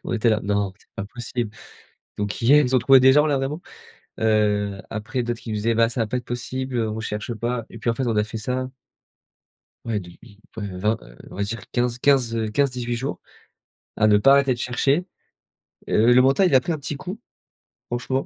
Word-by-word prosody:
On - - -3
était 115 0 +2
là: 110 -1 +2
«Non, 100 -1 0
c'est - - -28
pas 100 - -3
possible. 120 0 -4 0.7
Donc 105 +2 -3
hier, 145 +5 +6
ils 125 - -1
ont 130 - +6
trouvé 135 +3 +7
des 130 +1 +6
gens 150 +2 +5
là, 145 -2 +1
vraiment?» 140 +5 -3 0.6
heu, 105 -2 +1
après 110 +4 -3
d'autres 120 0 -3
qui 115 - -9
nous - - -2
disaient: 115 +2 0
«Bah, 115 0 +4
ça 115 0 -2
va 110 - 0
pas 125 - -2
être 125 - -7
possible, 130 +2 -4
heu, 115 -2 0
on 110 +1 -4
cherche 110 +2 -4
pas». 120 +1 -3
Et - - -10
puis, 115 - -2
en - - +2
fait, 130 +3 -2
on 115 - 0
a 105 - +3
fait 110 +1 -6
ça 130 +4 -3 1.2
Ouais, 115 -2 -1
depuis, 100 +3 -13 0.2
ouais, 100 -4 -5
20, 105 +4 +1
heu, - - -15 0.2
on - - -10
va 100 - -2
dire 110 +3 -3
15-15, 125 0 +2
heu, 110 -1 -1
15-18 125 -1 0
jours 130 +4 -3 0.8
à 110 - +2
ne 105 -1 +6
pas 135 +6 +6
arrêter 140 -2 +4
de - - -7
chercher. 135 +7 +1 0.8
Heu, 115 +3 +4
le 125 - +6
mental, 135 +9 +4
il 140 - +1
a 130 - +7
pris 170 - -2
un 155 - -3
petit 145 +1 -5
coup, 185 +8 -7 0.7
franchement, 125 +2 -1
120 Hz, 225 wpm, -23 LUFS, 105-130 Hz, 1.2 s, trouvé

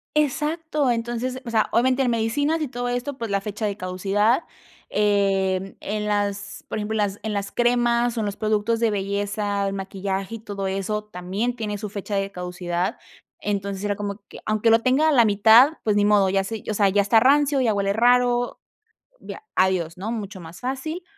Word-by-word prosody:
Exacto. 300 -1 0
Entonces, 240 +2 -3
o - - -5
sea, 220 -2 +1
obviamente 255 +3 +2
en 245 - +1
medicinas 285 +8 0
y 305 - -1
todo 245 -1 -4
esto, 245 +3 -3
pues 230 -4 -4
la 200 - +2
fecha 210 +2 -4
de 205 -1 -2
caducidad, 200 - +1 0.5
em, 195 -2 +1
en 210 +1 -3
las, 205 -1 -2
por - - -4
ejemplo, 215 +1 -3
en - - 0
las 205 -1 -1
en 220 - -2
las 200 -1 -3
cremas 240 0 +2
o - - +1
en 215 - -1
los 205 -1 -3
productos 215 +1 0
de 230 -2 +3
belleza, 200 0 -1
el 195 - -2
maquillaje 195 +1 -4
y - - -8
todo 200 -3 -5
eso, 195 +2 -2
también 205 +5 -3
tiene 210 -3 -3
su 210 +1 -5
fecha 200 0 -5
de 195 0 0
caducidad. 180 -1 -3 0.4
Entonces, 200 -1 -3
era 205 0 0
como 200 0 -5
que - - -11
aunque 215 +1 +2
lo 225 0 +6
tenga 260 +6 +3
a - - +3
la 245 -4 +6
mitad, 220 +7 +6
pues 210 -2 +1
ni 205 - +3
modo, 205 -2 +4
ya 195 0 +1
se 220 +2 -6
o - - 0
sea, 205 -1 +3
ya 200 +1 +3
está 205 +3 +4
rancio, 280 +2 +4
ya 230 -4 +2
huele 200 -1 0
raro. 245 +2 +3 0.7
Via - - -8
adiós, 185 -2 +1
¿no?, 210 +4 -3
mucho 200 -4 -5
más 165 +2 -11
fácil. 270 +7 -4
210 Hz, 200 wpm, -23 LUFS, 200-240 Hz, 0.7 s, lo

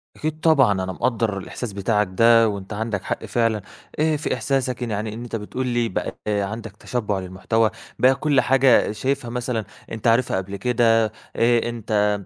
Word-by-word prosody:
أكيد 155 0 -3
طبعًا 145 -9 +4
أنا 95 -1 -1
مقدر 115 -3 -1
الإحساس 105 +2 -6
بتاعك 105 0 +1
ده 115 +3 +5
وأنت 100 0 -6
عندك 110 -2 -3
حق - - -3
فعلًا 115 -3 0 0.4
آآ 155 -1 +2
في 155 - -2
إحساسك 130 -2 -1
يعني 110 -2 -3
إن 120 +2 -7
أنت 120 - -5
بتقول 125 +4 -4
لي 120 -1 0
بقى - - -3
عندك 105 +1 -2
تشبع 105 -5 -2
للمحتوى، 95 +4 0 0.3
بقى 130 +1 +5
كل 140 -1 +2
حاجة 130 -4 +4
شايفها 130 +3 -2
مثلًا 120 -3 -2 0.3
أنت 115 +1 -3
عارفها 115 -3 +3
قبل 95 +1 -4
كده، 115 +1 +3 0.3
آآ 120 0 +2
أنت 105 -3 0
115 Hz, 165 wpm, -22 LUFS, 105-125 Hz, 0.4 s, ده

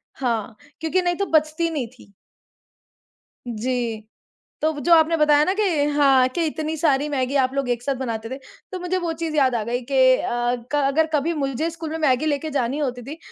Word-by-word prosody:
हाँ, 230 -5 -2 0.2
क्योंकि 325 +3 0
नहीं 350 0 +1
तो 400 - -1
बचती 310 +2 -2
नहीं 290 -7 -2
थी। 200 - -18 1.4
जी। 235 -1 -2 0.6
तो 315 +1 +2
वो 290 - -6
जो 340 +5 +5
आपने 325 0 +4
बताया 300 -1 +4
ना 370 - +1
कि 425 - 0 0.3
हाँ, 275 -3 +4
कि 330 +6 -2
इतनी 315 +1 -3
सारी 290 -2 +1
मैगी 265 -2 -1
आप 260 -1 +2
लोग 275 -2 -1
एक 240 -1 -1
साथ 275 +2 -1
बनाते 225 -3 -4
थे। 260 - -5 0.3
तो 370 - -4
मुझे 360 +1 -1
वो 345 -2 -2
चीज़ 325 -1 -4
याद 265 -4 +3
आ 230 - 0
गई 240 +2 -2
कि 275 - -1 0.2
अ, 240 0 -1 0.2
क - - -2
अगर 315 +3 +2
कभी 300 +3 +1
मुझे 285 +2 -2
स्कूल 325 -1 -7
में 320 - -3
मैगी 300 -1 +2
लेके 300 +1 -1
जानी 270 -1 -1
होती 250 -4 -3
थी 285 +6 -8
285 Hz, 205 wpm, -22 LUFS, 255-320 Hz, 1.4 s, जो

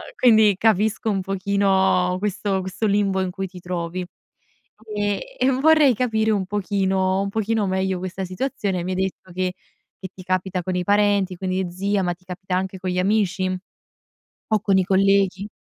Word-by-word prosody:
quindi 220 -5 +5
capisco 220 0 +2
un 195 -2 0
pochino 190 -1 +1
questo 200 -1 -1
questo 190 +4 -3
limbo 200 -1 +1
in 185 -1 -2
cui 195 +1 -4
ti 180 -1 -12
trovi, 175 0 -4 0.9
e 205 -1 0 0.2
e 260 - +3
vorrei 285 0 +4
capire 220 -2 0
un 200 -3 0
pochino 190 -2 0
un 200 - -2
pochino 220 0 0
meglio 190 0 0
questa 185 +1 -4
situazione. 195 -3 -2
Mi 185 - -3
hai - - -1
detto 185 -1 -6
che 185 0 -1 0.5
che 190 - -6
ti 185 - -11
capita 185 0 -1
con 185 +1 -2
i 180 - 0
parenti, 200 -1 +2
con 190 - -5
gli 185 0 -1
zii, 195 +3 -1
ma 175 -1 0
ti 180 +1 -22
capita 185 0 -4
anche 190 +1 -2
con 185 0 -3
gli 180 - -1
amici 195 -1 +1 1.0
o 215 -1 +3
con 195 -2 +2
i 190 - +3
colleghi? 195 0 +2
190 Hz, 175 wpm, -22 LUFS, 185-205 Hz, 1.0 s, quindi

